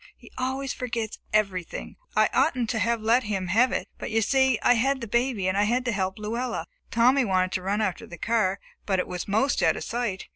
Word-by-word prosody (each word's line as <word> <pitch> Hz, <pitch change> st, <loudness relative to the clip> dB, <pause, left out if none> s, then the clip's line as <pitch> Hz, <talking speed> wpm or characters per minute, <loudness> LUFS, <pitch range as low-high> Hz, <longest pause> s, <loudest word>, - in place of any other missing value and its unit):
He -, -, -16 dB
always 260 Hz, +1 st, -2 dB
forgets 230 Hz, -3 st, -4 dB
everything. 195 Hz, -5 st, -1 dB, 0.2 s
I -, -, +5 dB
oughtn't 250 Hz, -7 st, +2 dB
to 220 Hz, -, -1 dB
have 230 Hz, +2 st, +1 dB
let 230 Hz, +2 st, +3 dB
him 195 Hz, -3 st, -2 dB
have 240 Hz, +7 st, +4 dB
it, -, -, -2 dB
but, -, -, -4 dB
you 225 Hz, 0 st, +2 dB
see, 265 Hz, +1 st, +3 dB
I -, -, +6 dB
had 265 Hz, +3 st, +1 dB
the 235 Hz, -, -5 dB
baby 235 Hz, -3 st, 0 dB
and 185 Hz, -, +1 dB
had 230 Hz, +5 st, +1 dB
to 240 Hz, -, +1 dB
help 190 Hz, -2 st, -2 dB
Luella. 230 Hz, +4 st, -3 dB, 0.2 s
Tommy 255 Hz, +4 st, +4 dB
wanted 185 Hz, -4 st, +1 dB
to 185 Hz, -, -2 dB
run 200 Hz, +3 st, -1 dB
after 190 Hz, -4 st, -2 dB
the 170 Hz, -, -10 dB
car, 210 Hz, -2 st, +1 dB, 0.3 s
but 195 Hz, -2 st, +2 dB
it 180 Hz, -, -1 dB
was 180 Hz, -1 st, -5 dB
'most 220 Hz, +8 st, +1 dB
out -, -, +3 dB
of -, -, -5 dB
sight. 230 Hz, -5 st, -3 dB
225 Hz, 220 wpm, -26 LUFS, 195-250 Hz, 0.3 s, I